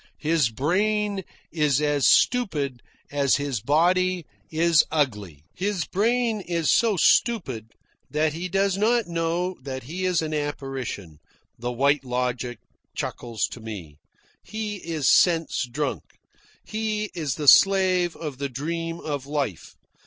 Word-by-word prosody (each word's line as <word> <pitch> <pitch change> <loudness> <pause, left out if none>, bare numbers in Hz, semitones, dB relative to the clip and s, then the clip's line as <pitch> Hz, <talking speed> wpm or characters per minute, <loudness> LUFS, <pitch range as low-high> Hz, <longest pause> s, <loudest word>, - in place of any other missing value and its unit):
His 155 -5 +1
brain 200 - 0 0.3
is 150 -4 +2
as 145 -2 +2
stupid 150 - +2 0.3
as 140 -2 +2
his 140 -6 -2
body 175 - +2 0.2
is 165 0 +4
ugly. 105 - -2
"His 195 -2 -2
brain 225 +2 +1
is 170 -3 +1
so 225 -4 +3
stupid 130 - +2 0.4
that 155 0 +1
he 175 +3 -4
does 195 +1 +1
not 230 +2 +2
know 170 +2 -2 0.3
he 175 +9 -4
is 180 -3 +1
an 155 0 -3
apparition," 135 - -4 0.4
the 120 +1 -3
White 140 +4 +2
Logic 125 -1 -2 0.4
chuckles 115 -2 -3
to - - -8
me. 95 -10 -8 0.4
"He 215 -1 -5
is 165 -5 -2
sense 165 -6 +3
drunk. 130 - -2 0.6
He 215 -1 -2
is 155 -7 -2
the 150 - -4
slave 185 -1 +5
of 150 -5 -6
the 140 -1 -2
dream 165 +5 -4
of 145 -3 -4
life. 140 - -3
155 Hz, 130 wpm, -25 LUFS, 135-185 Hz, 0.6 s, slave